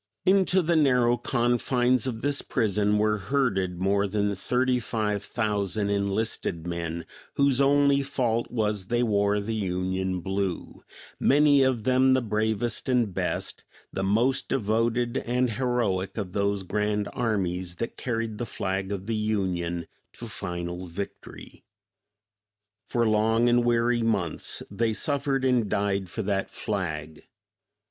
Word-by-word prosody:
"Into 190 -1 +4
the 170 +1 +2
narrow 125 -6 +4
confines 120 0 +1
of 115 -3 -4
this 145 0 0
prison 105 -3 +1
were 105 0 +2
herded 95 -6 0
more 100 +2 +2
than 100 0 0
thirty 125 +5 +1
five 105 -3 -2
thousand 105 -3 -1
enlisted 100 -4 -1
men, 85 -1 -4 0.3
whose 140 -1 +3
only 140 0 +4
fault 125 -4 -1
was 105 -5 -1
they 120 +2 +1
'wore 100 -2 +2
the 105 +3 -3
Union 95 -2 -1
blue,' 95 -1 -3 0.4
many 145 0 +5
of 130 -4 +2
them 130 +1 +4
the 130 - +2
bravest 110 +2 -1
and 120 -6 +2
best, - - -3 0.3
the - - -2
most 115 +7 +1
devoted 115 +1 0
and 125 0 0
heroic 115 -6 -1
of 95 -4 -4
those 100 -1 0
grand 105 +2 -1
armies 95 -6 -1
that 115 - -4
carried 115 -3 -3
the 120 - -3
flag 95 0 -3
of 100 -1 -4
the 115 - -2
Union 90 -6 -1 0.3
to - - -8
final 90 +1 -5
victory. 95 +4 -8 1.2
For 115 +2 +1
long 110 +2 +3
and 120 0 +4
weary 120 0 +2
months 100 -8 -1
they 110 +2 0
suffered 140 0 -1
and 125 -5 +2
died 100 -2 0
for - - -4
that 100 -1 -1
flag. 80 -7 -4
110 Hz, 135 wpm, -26 LUFS, 95-120 Hz, 1.2 s, many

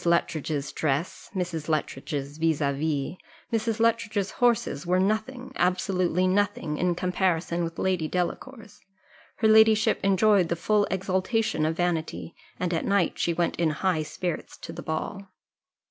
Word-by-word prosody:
Luttridge's 155 -4 0
dress, 155 +3 -2
Mrs. 170 -4 -3
Luttridge's 145 -1 -3
vis 160 -2 +2
à 140 -2 0
vis, 150 +2 -2 0.4
Mrs. 225 0 0
Luttridge's 225 -3 +1
horses 235 - +1
were 180 +1 +2
nothing, 220 +6 -1
absolutely 180 0 +1
nothing, 185 -5 0
in 180 -1 +1
comparison 175 -1 0
with 165 0 -4
Lady 185 -4 0
Delacour's: 205 +6 -4 0.5
her 220 - +2
ladyship 220 0 +5
enjoyed 195 -2 +4
the 170 - +1
full 205 +4 +2
exultation 190 -2 0
of 160 +1 -2
vanity; 170 -2 -2 0.3
and 180 -1 -1
at 165 - 0
night 195 -4 +1
she 170 - +1
went 170 0 0
in 170 -2 +2
high 160 +1 0
spirits 155 +2 -4
to - - -8
the - - -7
ball. 195 +5 -4
180 Hz, 145 wpm, -26 LUFS, 160-205 Hz, 0.5 s, ladyship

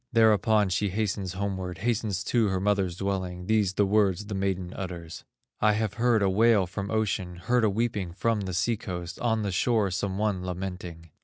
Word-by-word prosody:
Thereupon 110 -3 +4
she 100 +3 0
hastens 100 -2 -2
homeward, 95 -2 -3
Hastens 110 -4 -1
to 115 -3 +2
her 95 -1 0
mother's 95 -3 +1
dwelling, 95 -2 -3
These 105 -2 +1
the 100 - +3
words 100 -1 +2
the 105 - -6
maiden 95 -2 -2
utters: 85 -4 -7 0.3
"I 105 0 +4
have 105 -1 -1
heard 115 -2 +2
a - - +3
wail 110 -1 +4
from 100 +2 -5
ocean, 100 -5 -1
Heard 115 +8 +1
a 110 - +4
weeping 105 -4 -1
from 110 +4 0
the 95 -1 -4
sea 110 +5 +1
coast, 90 -4 -6
On 115 -2 0
the 100 - -1
shore 105 0 +1
some 95 +1 -2
one 100 -3 0
lamenting." 90 -3 -6
100 Hz, 185 wpm, -27 LUFS, 90-110 Hz, 0.3 s, Thereupon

